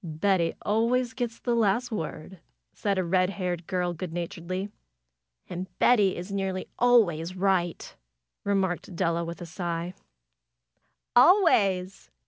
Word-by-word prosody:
"Betty 170 +1 0
always 235 +4 +1
gets 240 -3 -3
the 240 - -1
last 230 +2 +1
word," 165 -1 -5 0.3
said 200 -2 -1
a 185 - +1
red 185 +1 +2
haired 180 -4 -4
girl, 180 -1 -1
good 175 +1 -6
naturedly. 175 +3 -4 0.8
"And 180 +1 -5
Betty 205 -6 +4
is 180 +3 -6
nearly 190 -1 -2
always 185 -9 +3
right!" 185 -3 0 0.5
remarked 190 -2 -1
Della 170 -1 0
with 170 +1 -7
a - - -5
sigh. 170 0 -4 1.2
"Always!" 200 - +4
185 Hz, 120 wpm, -27 LUFS, 175-205 Hz, 1.2 s, Betty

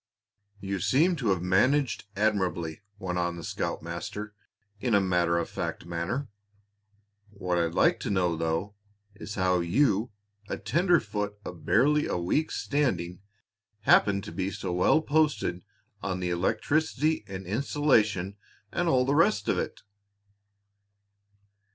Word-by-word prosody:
"You 95 -1 -3
seem 165 - +3
to 125 -6 -2
have 95 -3 +1
managed 125 +9 +2
admirably," 95 -5 0 0.2
went 90 -3 -3
on 85 0 -1
the 85 - -8
scoutmaster, 85 +9 -4 0.5
in 120 -1 +1
a - - +6
matter 90 -3 +2
of 85 - -1
face - - -4
manner. 85 +11 -3 1.0
"What 90 -4 -2
I'd 85 0 -1
like - - +3
to - - -4
know, 90 -4 +1
though, 80 +5 -2 0.4
is 100 0 -8
how 95 -1 +2
you, 105 +5 +2 0.4
a - - -2
tenderfoot 105 - +1
of 85 -3 -9
barely 150 +5 +3
a - - -1
week's 95 - 0
standing, 90 - -1 0.6
happened 100 -2 +4
to - - -7
be 95 +3 -2
so 100 -3 -4
well 90 - +4
posted 145 - +1 0.4
on 95 -1 -3
electricity 145 - 0
and 95 -1 -7
insulation 110 -4 +1 0.3
and 175 -1 0
all 130 -4 +3
the 135 - +1
rest 145 -9 +3
of - - +2
it?" - - -4
100 Hz, 130 wpm, -28 LUFS, 90-130 Hz, 1.0 s, a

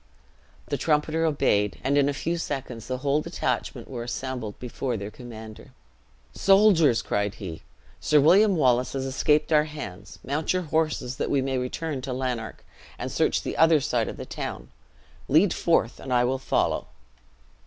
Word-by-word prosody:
The - - -1
trumpeter 155 +1 +1
obeyed; 105 -9 +1
and 140 - +1
in 145 0 +4
a - - -1
few 170 +4 -2
seconds 130 -7 -5
the 130 - -2
whole 140 +2 +2
detachment - - -3
were 125 -3 -6
assembled 120 -3 -5
before 125 0 -3
their 100 +1 -6
commander. 110 -3 -11 0.6
"Soldiers!" 190 - +4
cried 100 -1 -1
he, 85 -6 -7 0.4
"Sir 150 - +3
William 190 +7 +5
Wallace 125 -5 +2
has 135 -1 -2
escaped 150 +4 +1
our 150 0 +5
hands. 105 -10 -8
Mount 145 +6 -1
your 185 0 0
horses, 155 -5 -1
that - - -2
we 140 - +2
may 135 -1 -1
return 135 +3 -3
to 130 0 -4
Lanark, 125 -3 -4 0.3
and - - -5
search - - +1
the - - -4
other 160 -1 +5
side 125 -5 0
of - - -6
the - - -6
town. - - -6 0.6
Lead 165 +7 +4
forth, 170 - +1
and 130 - -7
I 125 -1 +4
will 130 +2 0
follow." - - 0
135 Hz, 165 wpm, -26 LUFS, 120-155 Hz, 0.6 s, William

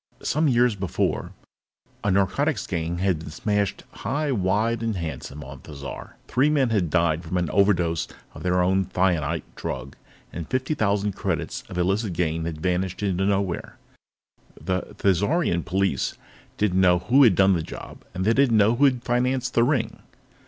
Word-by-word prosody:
Some 155 +3 +1
years 125 -2 +4
before, 95 -2 -2 0.7
a 105 - +1
narcotics 100 +7 +1
gang 85 -1 -2
had 90 -3 +1
been 80 - -8
smashed 100 +4 -1
high, 145 +1 -1
wide, 110 +2 +1
and 115 -2 -1
handsome 75 -4 -5
on 70 0 -10
Thizar. 70 -1 -9
Three 130 +5 +2
men 140 -5 +2
had 95 -7 +1
died 85 -1 +1
from 85 +2 -3
an 90 -1 -1
overdose 90 -5 +2 0.3
of - - -10
their 90 0 +2
own 95 +1 +2
thionite 90 -5 0
drug, 70 - -5 0.4
and 85 -2 -6
fifty 130 +3 0
thousand 105 -5 +1
credits - - -3
of - - -6
illicit 95 +3 0
gain 80 -1 -1
had 80 -2 -5
vanished 90 +2 -1
into 95 -1 +1
nowhere. 100 -3 -1 0.8
The 95 0 -3
Thizarian 100 - +1
police 95 -7 0 0.4
didn't 95 -3 +2
know 90 -1 +5
who 120 +11 +3
had 115 -9 +6
done 95 +1 +5
the 85 - 0
job, - - -9 0.2
and 95 +1 -2
they 115 - +4
didn't 130 -3 +4
know 105 +3 +4
who 145 - +5
had 125 -3 +2
financed 125 +1 0
the 115 - +4
ring. 130 -2 0
95 Hz, 165 wpm, -24 LUFS, 85-115 Hz, 0.8 s, had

